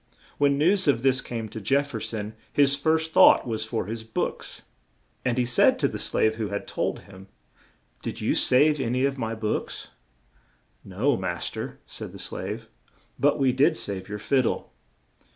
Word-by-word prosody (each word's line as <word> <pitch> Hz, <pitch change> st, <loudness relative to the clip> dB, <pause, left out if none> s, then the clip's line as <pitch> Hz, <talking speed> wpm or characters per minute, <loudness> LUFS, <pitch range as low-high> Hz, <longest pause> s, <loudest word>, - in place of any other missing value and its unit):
When 140 Hz, -1 st, +3 dB
news 180 Hz, +6 st, +2 dB
of 130 Hz, -4 st, +2 dB
this 135 Hz, -1 st, +3 dB
came 115 Hz, -2 st, -5 dB
to 110 Hz, -, -7 dB
Jef 140 Hz, +7 st, +1 dB
fer -, -, -4 dB
son, 105 Hz, -1 st, -4 dB, 0.2 s
his 140 Hz, -1 st, +4 dB
first 160 Hz, +2 st, +1 dB
thought -, -, +6 dB
was 110 Hz, -2 st, -3 dB
for 110 Hz, -2 st, -2 dB
his 110 Hz, +2 st, -5 dB
books, 110 Hz, 0 st, -4 dB, 0.6 s
and 125 Hz, -1 st, 0 dB
he 125 Hz, -, +2 dB
said 120 Hz, 0 st, +4 dB
to -, -, +2 dB
the -, -, -5 dB
slave 110 Hz, 0 st, +1 dB
who 110 Hz, -2 st, -2 dB
had 100 Hz, 0 st, -4 dB
told -, -, -2 dB
him: 95 Hz, 0 st, -14 dB, 0.7 s
"Did -, -, -5 dB
you -, -, +1 dB
save 150 Hz, +4 st, +4 dB
an 125 Hz, -2 st, -1 dB
y 130 Hz, -, +1 dB
of 135 Hz, 0 st, 0 dB
my 115 Hz, -1 st, -2 dB
books?" 110 Hz, -1 st, -3 dB, 0.9 s
"No, 115 Hz, +9 st, 0 dB
mas 90 Hz, -3 st, -3 dB
ter," -, -, -6 dB
said -, -, -7 dB
the -, -, -9 dB
slave, -, -, -4 dB, 0.5 s
"but 145 Hz, +3 st, +3 dB
we 135 Hz, -3 st, +3 dB
did 145 Hz, +6 st, +3 dB
save 95 Hz, -1 st, -4 dB
your 105 Hz, -, -4 dB
fid 130 Hz, +6 st, +2 dB
dle." 120 Hz, -, -2 dB
125 Hz, 185 wpm, -25 LUFS, 110-140 Hz, 0.9 s, thought